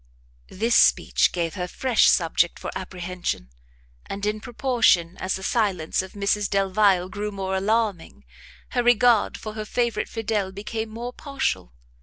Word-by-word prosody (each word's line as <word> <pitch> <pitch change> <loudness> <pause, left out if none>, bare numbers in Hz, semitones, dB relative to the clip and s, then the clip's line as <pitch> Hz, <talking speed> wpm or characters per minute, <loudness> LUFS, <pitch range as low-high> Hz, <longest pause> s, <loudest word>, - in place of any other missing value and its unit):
This 230 +5 0
speech - - +4
gave 170 -2 -2
her 180 -2 -4
fresh 250 +5 +3
subject 170 0 +2
for - - -6
apprehension; 180 - -5 0.6
and 200 +1 -4
in 210 +1 -1
proportion 225 -7 +2
as 190 - -1
the 190 - -7
silence 190 -9 0
of 190 - -10
Mrs 205 0 0
Delvile 195 -1 +2
grew 210 +2 -4
more 190 -1 -3
alarming, 195 - -1 0.4
her 245 - 0
regard 240 -2 +4
for 215 - -7
her 215 0 -4
favourite 235 +2 -1
Fidel 215 -4 -2
became 215 +3 -5
more 235 +3 -6
partial. 275 - -3
205 Hz, 145 wpm, -24 LUFS, 185-225 Hz, 0.6 s, speech